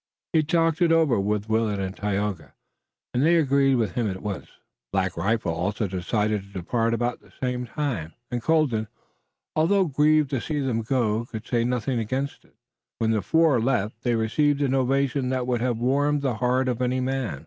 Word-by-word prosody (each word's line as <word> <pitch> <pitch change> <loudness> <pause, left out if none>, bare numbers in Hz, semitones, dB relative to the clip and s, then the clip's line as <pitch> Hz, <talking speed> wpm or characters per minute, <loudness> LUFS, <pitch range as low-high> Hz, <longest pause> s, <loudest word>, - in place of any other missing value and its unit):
He 160 - +5
talked 165 +1 +1
it 170 -1 +4
over 160 -9 +3
with 105 +1 -1
Willet 110 -2 +1
and 95 0 -3
Tayoga, 100 -4 -3 0.6
and 125 - +1
they 165 +3 +5
agreed 140 -3 +3
with 115 -4 0
him 115 -4 -1
at 95 -1 -6
once. 100 -3 -4 0.4
Black 95 -1 0
Rifle 95 0 0
also 100 +6 -1
decided 105 +3 -1
to 100 - -16
depart 115 +5 -1
about 120 +1 -1
the - - -22
same 125 -1 -2
time, 120 - -3 0.2
and 120 -1 -2
Colden, 130 -7 +1 0.7
although 190 +5 +3
grieved 150 -1 +3
to 130 -4 -1
see 150 -2 -2
them 125 -5 0
go, 115 -2 0
could 115 -2 -8
say 120 -2 +1
nothing 125 0 -1
against 130 +5 -3
it. - - -27 0.4
When 115 -1 +1
the 110 -2 +1
four 150 - +3
left 110 -2 -1
they 120 -1 +1
received 145 +6 +1
an 135 -2 +1
ovation 135 0 +1
that 130 -1 -1
would 125 -2 -1
have 120 -2 0
warmed 140 +4 +1
the 135 -3 +1
heart 125 +2 +1
of 125 -1 -1
any 125 +1 +1
man. 130 - -2
125 Hz, 190 wpm, -25 LUFS, 110-140 Hz, 0.7 s, He